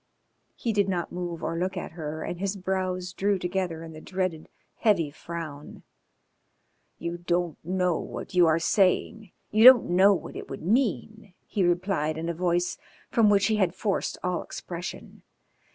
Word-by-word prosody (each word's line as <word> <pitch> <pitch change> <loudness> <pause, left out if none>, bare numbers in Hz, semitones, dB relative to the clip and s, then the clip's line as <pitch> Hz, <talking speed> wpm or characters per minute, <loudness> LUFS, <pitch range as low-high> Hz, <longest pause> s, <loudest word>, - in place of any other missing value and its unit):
He 230 - -2
did 200 -1 +2
not 175 -3 -2
move 175 -2 -5
or 165 - -2
look 185 +1 -2
at - - -5
her, 155 -1 -5
and 175 - -5
his 200 +1 -1
brows 185 -1 -2
drew 200 +1 +1
together 180 -2 -2
in 165 -1 -9
the 155 - -10
dreaded 185 -4 -3 0.3
heavy 180 -10 +2
frown. 155 -2 -8 1.1
"You 170 +1 -4
don't 175 -1 -1
know 180 -1 0
what - - -7
you 175 -2 +5
are 160 0 +4
saying. 195 +3 +1 0.2
You 215 +1 +4
don't 250 -6 +9
know 195 +3 +6
what - - -7
it - - -7
would - - -7
mean," 215 -1 -1
he 200 - -1
replied 175 -3 0
in 165 +1 -3
a - - -1
voice 175 +1 0 0.3
from 225 -3 +4
which 200 -1 +4
he 215 +1 +2
had 185 -3 +1
forced 200 0 -1
all 180 -1 -1
expression. 175 +1 -7
180 Hz, 170 wpm, -27 LUFS, 170-195 Hz, 1.1 s, don't